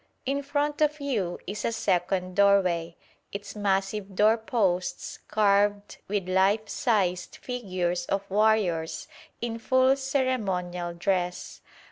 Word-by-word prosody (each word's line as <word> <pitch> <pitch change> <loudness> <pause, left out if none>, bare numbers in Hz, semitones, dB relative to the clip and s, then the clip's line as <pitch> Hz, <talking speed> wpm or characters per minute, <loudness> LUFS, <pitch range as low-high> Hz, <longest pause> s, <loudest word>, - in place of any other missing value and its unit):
In 275 +2 0
front 290 +1 -1
of 300 0 +2
you 220 -11 -2
is 205 +3 -5
a - - 0
second 185 -3 0
doorway, 185 -5 +3 0.4
its 200 +1 -7
massive 195 0 -1
door 215 +3 +5
posts 205 -6 -1
carved 205 -1 +2
with 200 -2 -2
life 195 +4 +2
sized 185 -8 0
figures 185 -8 -3
of 195 0 -2
warriors 200 -6 +1 0.3
in 230 -1 -3
full 260 +3 +3
ceremonial 195 -11 -1
dress. 180 0 -2
200 Hz, 115 wpm, -27 LUFS, 180-225 Hz, 0.4 s, door